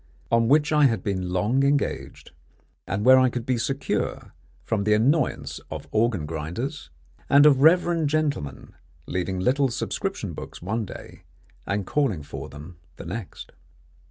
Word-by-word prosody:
on 115 0 +3
which 150 +4 +3
I 150 -1 +5
had 115 -8 +1
been 95 -3 -2
long 105 +9 +1
engaged, 140 +1 -1 0.6
and 100 +4 -2
where 130 +1 +8
I 130 0 +4
could 120 -1 -5
be 125 -2 0
secure 135 +3 -2 0.3
from 110 -3 -1
the 105 +1 +3
annoyance 135 +6 +1
of - - -7
organ 110 -7 +1
grinders, 85 - -5 0.4
and 145 +1 +7
of 140 -3 +5
reverend 165 -1 +4
gentlemen 145 - -2 0.3
leaving 95 +1 -2
little 135 +7 +2
subscription 120 - -3
books - - -9
one 110 +5 -2
day - - -11 0.5
and 100 0 -1
calling 115 - 0
for 75 - -8
them 75 +4 -11 0.2
the - - -10
next. 95 +3 -7
115 Hz, 150 wpm, -25 LUFS, 95-140 Hz, 0.6 s, where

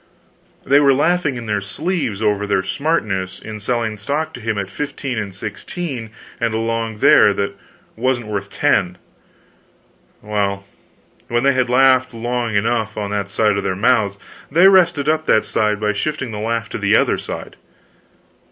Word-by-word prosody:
They 140 +1 +5
were 140 -2 +4
laughing 160 -1 +1
in 120 -1 -6
their 105 -2 -1
sleeves 110 - -3
over 105 -1 +1
their 95 -2 +1
smartness 95 - -1
in 110 -1 -8
selling 110 -1 -2
stock 145 +9 -2
to 125 - -9
him 110 -1 -2
at 100 -1 -2
15 140 -2 -4
and 100 -2 -4
16 115 - -6 0.3
and 115 -2 0
along 115 -1 -2
there 105 -1 +6
that 100 0 -2 0.4
wasn't 120 0 0
worth 100 -2 -4
10. 100 -10 +1 1.3
Well, 100 -2 -2 0.6
when 120 +1 0
they 140 0 +4
had 130 -1 +1
laughed 130 -1 +4
long 120 -1 -2
enough 110 +1 0
on 100 -1 -3
that 100 -1 -2
side 105 0 +1
of 100 - -2
their 95 - -1
mouths, 105 -2 +2 0.3
they 175 +4 +6
rested 170 -6 +4
up 155 0 +1
that 110 - +3
side 105 -1 0
by 105 0 0
shifting 130 +2 -3
the 105 - -5
laugh 115 +1 -2
to - - -5
the - - +3
other - - +1
side. - - -7
115 Hz, 165 wpm, -19 LUFS, 105-135 Hz, 1.3 s, there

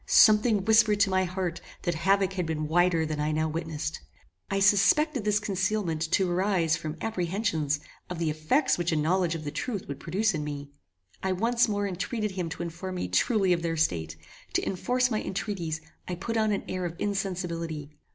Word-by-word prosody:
Something 215 -2 +5
whispered 220 -2 +5
to 200 -2 +4
my 185 0 +2
heart 180 -1 -3 0.2
that 175 - 0
havoc 195 +3 +2
had 180 -3 -2
been 155 -1 -2
wider 170 0 +3
than 155 -1 -3
I 150 +1 0
now 155 +1 +1
witnessed. 160 -1 -4 0.5
I 195 0 0
suspected 215 +7 +4
this 210 0 +3
concealment 195 -4 -1
to 190 -2 +3
arise 175 -2 +2
from 155 0 -5
apprehensions 175 -7 -1 0.3
of 180 - -4
the 165 -2 0
effects 155 - +1
which 175 0 0
a - - +1
knowledge 170 +2 +1
of 160 - -5
the 145 - -4
truth 200 - -4
would 140 -1 -6
produce 195 +8 0
in 155 -2 -2
me. 145 -1 -6 0.5
I 190 0 0
once 235 +6 +2
more 205 -1 -1
entreated 210 +3 -2
him 180 -3 -3
to 170 +1 -5
inform 170 +2 -5
me 135 - -3
truly 190 - +3
of 170 - -1
their 165 -1 -1
state. 80 - 0 0.4
To - - +1
enforce 250 +6 0
my 215 - 0
entreaties, 175 -5 -3 0.3
I 180 - -3
put 230 +6 -4
on 215 -1 +2
an 200 - -1
air 185 -1 -3
of 170 -1 -3
insensibility. 170 -7 -3
180 Hz, 190 wpm, -28 LUFS, 160-205 Hz, 0.5 s, Something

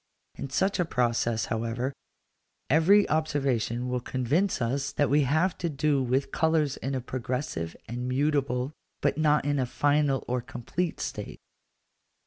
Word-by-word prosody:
In 140 - -6
such 190 +8 +1
a - - +4
process, 120 -6 0
however, 115 +4 -2 0.8
every 190 +7 +5
observation 135 -6 0
will 125 0 -1
convince 135 +11 0
us 135 +4 -1
that 145 -3 +1
we 150 +1 +5
have 155 +7 +2
to 170 - -1
do 145 -1 +1
with 130 +2 0
colours 160 -4 +1
in 135 +1 -3
a 130 - -2
progressive 125 - -3
and 125 +2 -4
mutable, 135 -1 0 0.3
but - - +1
not 150 -2 +3
in 145 -1 +1
a 130 - 0
final 145 0 +2
or 125 0 0
complete, 155 +9 -3
state. - - -5
135 Hz, 145 wpm, -28 LUFS, 125-150 Hz, 0.8 s, every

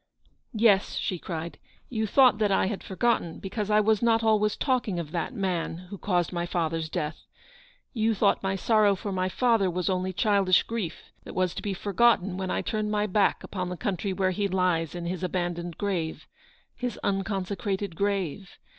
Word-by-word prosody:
" - - -40
Yes," 210 -3 +3
she 180 - -2
cried, 165 -1 -5 0.2
" - - -35
you 220 0 +1
thought 250 -2 +5
that 210 -2 +2
I 195 - +3
had 195 +1 -3
for 190 - -8
gotten, 230 -7 +1
because 205 +2 -4
I 210 0 +5
was 215 0 +2
not 230 -1 +3
always 210 -1 +2
talking 250 -9 0
of 165 -3 -4
that 170 +7 -2
990 250 - -8 0.4
man - - -16
who 200 - -7
caused 180 -3 0
my 175 0 -2
father's 165 -2 -1
death. 150 0 -4 0.7
You 225 -2 +1
thought 200 0 +2
my 195 0 -1
sorrow 210 +1 +3
for 200 +2 -5
my 185 0 0
father 225 -3 +2
was 180 +1 -1
only 185 0 -1
childish 195 -2 +3
grief, 220 -8 -4 0.2
that - - -10
was 185 -1 +1
to - - -5
be 200 -2 -3
forgotten 200 -1 +2
when 190 0 -3
I - - -1
turned 215 -1 -1
my 210 0 +1
back 210 0 +2
upon 180 -2 -4
the 180 - -5
country 195 +1 -2
where 185 0 +1
he 200 +2 0
lies 180 -4 0
in 175 -1 -5
his 180 +1 -3
abandoned 175 -2 -3
grave 180 -6 -2 0.5
— - - -45
his 245 -3 -2
unconsecrated 195 -1 -2
grave 195 -2 -2
195 Hz, 200 wpm, -27 LUFS, 180-210 Hz, 0.7 s, thought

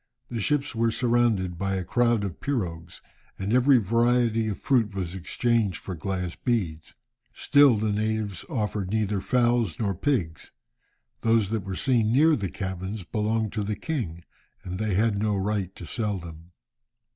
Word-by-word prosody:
The 115 -2 -3
ships 145 +3 0
were 115 0 +1
surrounded 115 -7 +1
by 95 0 -1
a 95 - -2
crowd 120 +2 +2
of 95 -4 -5
pirogues, 90 -10 -4 0.4
and 100 +3 -2
every 130 +2 +5
variety 115 +1 +2
of 105 - -2
fruit 115 -7 +1
was 90 -3 -3
exchanged 105 +2 0
for 95 - -6
glass 90 +1 -3
beads. 90 -11 -2 0.4
Still 145 -4 +5
the 105 0 0
natives 110 -1 -2
offered 105 - -2
neither 105 -2 0
fowls 120 -6 +1
nor 100 -4 0
pigs. 90 - -2 0.7
Those 115 -3 +2
that 110 -3 -1
were 95 0 -5
seen 115 -2 +2
near 155 +5 +5
the 100 -7 -3
cabins 95 +1 -5
belonged 110 +3 -1
to 105 -2 -1
the 105 +1 -2
king, 95 - -4 0.4
and 90 +1 -5
they 110 -3 0
had 105 0 +2
no 105 0 +1
right 95 -1 -2
to 90 - -9
sell 105 +1 -2
them. 85 -1 -10
105 Hz, 160 wpm, -26 LUFS, 95-115 Hz, 0.7 s, every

